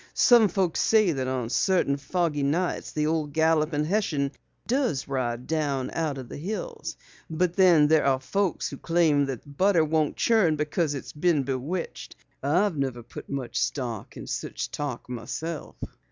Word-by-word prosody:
Some 235 -3 +6
folks 185 -2 0
say 215 -5 +4
that 130 -4 -2
on 125 -3 -2
certain 175 -4 +2
foggy 150 +1 -1
nights 160 +6 -1
the 150 0 -1
old 155 -2 -1
Galloping 160 -1 +2
Hessian 155 -7 0 0.3
does 245 - 0
ride 125 -3 -2
down 145 -5 -1
out 155 -4 -1
of 130 -2 -7
the - - -8
hills. 220 - -5 0.3
But 170 +2 0
then 175 -6 +6
there 155 0 +4
are 135 -1 +3
folks 195 +6 -1
who 140 - -7
claim 160 -4 +2
their 130 -4 -4
butter 165 +3 +2
won't 155 -1 0
churn 215 -9 +3
because 150 0 -1
it's 135 - -7
been 150 -2 +2
bewitched. 140 +7 -4 0.3
I 170 +9 +3
never 135 -6 -3
put - - -10
much 135 -3 -3
stock 120 -6 -3
in - - -7
such - - -4
talk 145 -5 -4
myself." 130 +6 -5
150 Hz, 160 wpm, -26 LUFS, 140-175 Hz, 0.3 s, Some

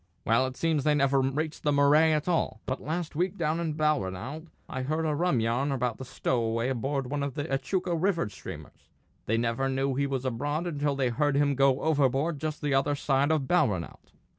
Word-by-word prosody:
Well, 115 +4 +3
it 130 - -8
seems 160 -4 +1
they 150 0 +3
never 140 -1 +3
reached 150 +4 -2
the 150 - +1
Murray 145 +3 +5
at 155 +1 0
all; 165 -10 0
but 130 - -3
last 160 +1 -3
week 180 +4 -1
down 160 0 0
in 160 -3 -2
Balranald 150 - -1 0.2
I 130 - -4
heard 155 +5 -1
a 155 - +1
rum 165 -4 +1
yarn 120 +5 0
about 125 -3 -2
a - - -5
stowaway 115 -2 -1
aboard 135 +2 -1
one 145 -1 -1
of 140 -2 -3
the 145 - -2
Echuca 175 +6 -1
river 170 - +1
steamers; 100 - -10 0.4
they 115 - +2
never 120 +3 0
knew 135 +1 0
he 140 +2 0
was 135 -1 -3
aboard 145 +7 -2
until 145 -4 -1
they 135 -2 +1
heard 145 +4 +1
him 145 -1 +3
go 135 0 +3
overboard 145 0 +1
just 155 0 -4
the 145 -1 +1
other 135 +2 +2
side 140 0 +1
of 150 -4 +1
Balranald. 105 - 0
140 Hz, 205 wpm, -28 LUFS, 130-155 Hz, 0.4 s, Murray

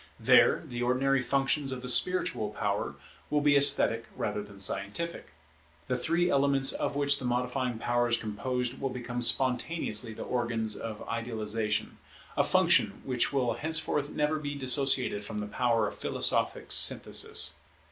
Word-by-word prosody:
There - - +4
the 120 0 -6
ordinary 130 +2 +1
functions 135 +2 0
of 130 -1 -6
the - - -6
spiritual 180 +9 +2
power - - -3 0.3
will 150 0 +1
be 145 -1 +3
esthetic 140 0 +3
rather 105 - -3
than 100 -1 -13
scientific. 100 - -3 0.6
The 125 - -1
three 170 +7 0
elements 140 -2 +2
of - - -3
which 140 0 +2
the 130 - -6
modifying 125 0 -2
power 120 +1 0
is 120 0 +1
composed 125 +4 -4
will 135 - -1
become 125 -1 -5
spontaneously 125 -2 +1
the - - -7
organs 115 -3 -2
of 110 -2 -7
idealization, 110 -2 -3 0.4
a - - +2
function - - +2
which 125 -2 0
will 130 -4 0
henceforth 150 +2 -1
never 150 +1 -1
be 145 -1 -5
dissociated 130 -5 +3
from 105 +1 -6
the 105 - -3
power 115 0 0
of - - -9
philosophic - - 0
synthesis. 75 0 +2
125 Hz, 150 wpm, -28 LUFS, 115-140 Hz, 0.6 s, There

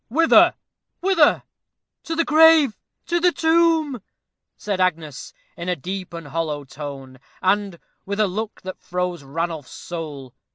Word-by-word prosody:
"Whither? 325 +7 +5 0.4
whither?" 360 -5 +3 0.6
"To 330 - -3
the 335 0 +1
grave 310 -5 +6 0.3
to 345 0 0
the 355 +1 +4
tomb," 320 -6 +2 0.6
said 200 -3 -2
Agnes, 160 -6 -2 0.2
in 170 +1 -5
a 180 - +1
deep 185 +4 -6
and 165 -3 -8
hollow 155 -2 -2
tone, 135 -2 -9 0.2
and 195 -1 0 0.3
with 200 +2 -4
a 215 - +4
look 210 +3 -5
that 185 0 -7
froze 180 -1 -3
Ranulph's 160 0 -4
soul. 150 -7 -7
185 Hz, 135 wpm, -22 LUFS, -, 0.6 s, grave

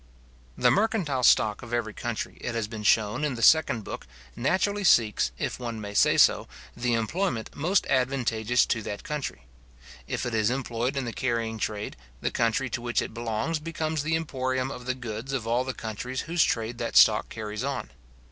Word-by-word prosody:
The - - +4
mercantile 195 - +1
stock 110 -3 +4
of 120 -1 -3
every 110 -2 -2
country, 120 +1 -4
it 115 - -3
has 115 -2 -1
been 110 -1 -7
shown 105 +5 +2
in 145 -4 0
the 115 - -4
second 130 -6 +5
book, - - -7 0.3
naturally 200 +9 0
seeks, 115 - +4
if - - -3
one 115 -3 -4
may 100 -1 -6
say - - +4
so, - - +5 0.3
the 120 -1 0
employment 115 - -1
most 180 +7 +1
advantageous 125 -3 +1
to 115 - -1
that 100 -1 -6
country. 150 -2 -4 0.6
If - - -2
it 120 - -3
is 110 -1 +2
employed 125 0 -2
in 135 - -1
the 115 - -4
carrying 115 -3 -1
trade, 105 -1 -3 0.2
the - - -1
country 115 +3 +1
to 120 - -2
which 120 0 0
it - - -3
belongs 115 +7 -2
becomes 160 -1 -2
the 155 +2 0
emporium 130 -4 -1
of 125 -1 -8
the 130 - 0
goods 120 +1 -6
of 125 -5 -2
all 120 +2 +1
the 130 - -3
countries 125 +2 -5
whose 170 0 +2
trade 115 +1 -1
that 115 - 0
stock 105 -1 +6
carries 110 0 -5
on. 140 - -3
120 Hz, 190 wpm, -27 LUFS, 110-135 Hz, 0.6 s, stock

